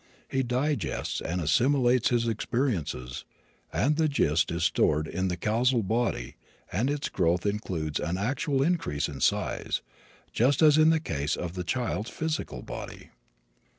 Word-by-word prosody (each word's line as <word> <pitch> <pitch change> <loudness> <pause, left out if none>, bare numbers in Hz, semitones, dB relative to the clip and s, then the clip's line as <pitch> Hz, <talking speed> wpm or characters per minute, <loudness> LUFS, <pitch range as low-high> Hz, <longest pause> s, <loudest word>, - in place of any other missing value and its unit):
He 135 - 0
digests 130 +4 -1
and 90 +2 -2
assimilates 125 - +3
his 120 -1 +1
experiences 105 - -2 0.5
and 150 +3 +1
the 160 -1 +3
gist 80 - +2
is 85 0 -2
stored 75 -2 +2
in 95 +4 -1
the 90 -1 -2
causal 115 +5 +2
body 110 - -1 0.3
and 115 +9 0
its 145 0 -1
growth 90 0 +1
includes 90 -7 -2
an 85 +2 -2
actual 135 - 0
increase 135 - 0
in 70 -2 -7
size, - - 0 0.5
just 130 +6 +3
as 155 0 +6
in 155 +1 +6
the 160 0 +3
case 75 - -2
of 90 -1 -5
the 90 -1 -4
child's 110 0 -2
physical 155 - -3
body. - - -8
110 Hz, 150 wpm, -28 LUFS, 85-135 Hz, 0.5 s, as